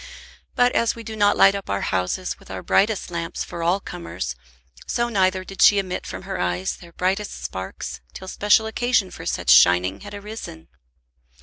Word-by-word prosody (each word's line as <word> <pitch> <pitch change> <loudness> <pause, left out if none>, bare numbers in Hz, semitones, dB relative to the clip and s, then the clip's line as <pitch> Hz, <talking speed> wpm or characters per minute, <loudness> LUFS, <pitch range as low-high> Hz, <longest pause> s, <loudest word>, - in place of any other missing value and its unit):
But 245 0 +4
as 230 - +1
we 230 - -9
do 220 0 -7
not 205 -1 +3
light 195 - +7
up 200 -1 -6
our 100 0 -1
houses 95 - -2
with - - -18
our 95 -1 -6
brightest 205 -3 +1
lamps 170 -1 -3
for 170 - -7
all 175 +4 +2
comers, 85 - -6 0.5
so 240 0 0
neither 185 -3 +1
did 195 +1 -7
she 205 - +7
emit 185 -2 -2
from - - -7
her 190 -1 -5
eyes 90 - -1
their 170 -1 -14
brightest 190 +4 -2
sparks 95 -8 -6
till 190 - -10
special 210 +3 +3
occasion 220 -3 +1
for 85 - -8
such 60 - +1
shining 90 +8 +5
had 205 - -9
arisen. 200 - -9
185 Hz, 185 wpm, -23 LUFS, -, 0.5 s, light